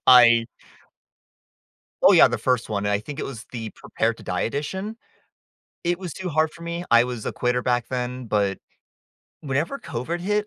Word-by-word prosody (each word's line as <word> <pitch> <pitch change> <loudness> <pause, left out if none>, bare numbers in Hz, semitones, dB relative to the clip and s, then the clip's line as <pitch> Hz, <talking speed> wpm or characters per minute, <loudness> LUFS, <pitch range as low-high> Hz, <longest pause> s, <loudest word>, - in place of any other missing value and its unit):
I 120 -2 +8 1.6
oh, - - +8
yeah - - +8
the - - -1
first 125 -4 0
one, 105 -1 -1
and 105 - +1
I 100 - +2
think 145 +6 -8
it - - -2
was 120 -5 -7
the 115 -3 -5
Prepared 115 0 -1
to - - -13
Die 90 0 -2
edition. 190 - -3 0.9
It 175 +1 +1
was 180 -5 -6
too 190 -1 -5
hard 155 +1 +2
for 170 - -13
me. 170 +1 -4
I 120 +1 +7
was 125 -3 -5
a - - -1
quitter 125 0 0
back 120 -1 0
then, 125 -1 -3
but, 100 -2 0 0.8
whenever 145 - -1
COVID 160 +9 -4
hit, 210 +3 0
125 Hz, 185 wpm, -24 LUFS, 115-170 Hz, 1.6 s, I